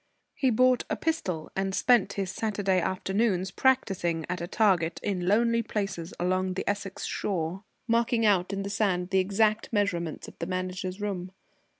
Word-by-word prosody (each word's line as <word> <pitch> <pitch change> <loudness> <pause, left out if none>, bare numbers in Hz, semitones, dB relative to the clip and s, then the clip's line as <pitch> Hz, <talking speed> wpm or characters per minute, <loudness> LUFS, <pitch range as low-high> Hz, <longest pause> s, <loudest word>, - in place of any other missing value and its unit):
He 270 -3 +1
bought 255 +2 +4
a - - 0
pistol, 185 - -2
and 195 0 -1
spent 245 -2 +3
his 195 -2 -2
Saturday 200 -4 0
afternoons 190 +1 0
practising 180 -10 +1
at 180 0 -3
a 170 - -3
target 180 -6 +2
in 180 -3 -1
lonely 230 +3 +3
places 195 -6 -3
along 185 +1 0
the - - -4
Essex 200 -1 -3
shore, 180 0 -2 0.2
marking 230 0 +2
out 190 -3 +3
in 195 0 -2
the 200 - -4
sand 185 -4 0
the 190 - +4
exact 210 +3 +1
measurements 180 -7 -1
of - - -13
the 165 - -3
Manager's 185 +1 -3
room. 190 -3 -4
195 Hz, 165 wpm, -28 LUFS, 180-215 Hz, 0.2 s, bought